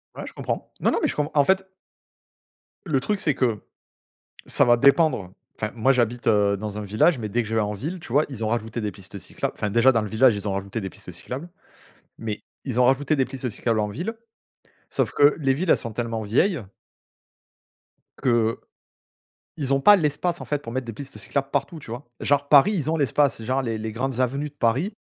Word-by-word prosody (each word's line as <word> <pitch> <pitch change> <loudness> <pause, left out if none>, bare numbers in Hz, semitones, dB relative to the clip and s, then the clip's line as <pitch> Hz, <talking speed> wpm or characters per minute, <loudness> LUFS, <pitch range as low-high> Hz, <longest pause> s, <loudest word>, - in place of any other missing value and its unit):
Ouais, - - -6
je - - -9
comprends - - -4
non, - - +2
non - - +1
mais - - +2
je - - -3
com 150 0 -1
en 145 -2 +5
fait 190 +4 +2 1.2
le 150 -7 +1
truc 205 +10 -1
c'est 150 -7 +1
que 115 -5 +1 0.9
ça - - +3
va 120 -1 +5
dépendre 140 - +3 0.2
enfin 110 +1 -3
moi 120 +4 +3
j'habite, 120 -1 0
heu, 100 -2 +3
dans 105 +1 -5
un - - -4
village 125 - +2
mais 110 -2 -4
dès 120 +3 0
que 110 - -8
je 110 - -2
vais 110 - +3
en 105 0 -1
ville, 155 - -5
tu 120 - -10
vois, 150 +2 +4
ils 115 -5 -5
ont - - 0
rajouté 115 0 -2
des 105 -1 -3
pistes 100 0 -10
cyclables - - -4
enfin, 105 - -2
déjà 120 +4 +5
dans 115 -2 +1
le 105 - -4
village 115 +2 +4
ils 100 - -6
ont 100 - -1
rajouté 100 +3 -3
des 95 -2 -5
pistes - - -11
cyclables, 140 +7 -7 0.7
mais 110 -2 -5 0.2
ils 125 -2 -1
ont 125 - +6
rajouté 140 +4 +2
des 135 - +2
pistes 130 -1 -5
cyclables 115 +1 -1
en 105 -1 0
ville 175 - -4 0.7
sauf - - 0
que 145 +1 +5
les 135 -2 +2
villes 165 +6 -2
elles - - +6
sont 115 - -6
tellement 115 -1 -3
vieilles 130 - +1 1.6
que, 115 -2 +2 1.0
ils 140 -3 +1
ont 135 - +1
pas 205 +8 +8
l'espace 170 +2 -1
en - - -6
fait 150 - -1
pour 115 -4 -9
mettre 130 0 -2
des 115 - -5
pistes 140 +5 -9
cyclables 140 -1 -2
partout, 140 +3 -2
tu 135 - -11
vois? 120 +4 -7
Genre 140 0 +1
Paris, 150 +9 +7
ils 155 -5 -1
ont 165 - +1
l'espace 140 -3 +1
genre 130 +4 0
les 115 -3 -2
les 110 0 -4
grandes 130 +2 -2
avenues 140 +4 -1
de - - -35
Paris 135 - +1
125 Hz, 225 wpm, -24 LUFS, 110-145 Hz, 1.6 s, pas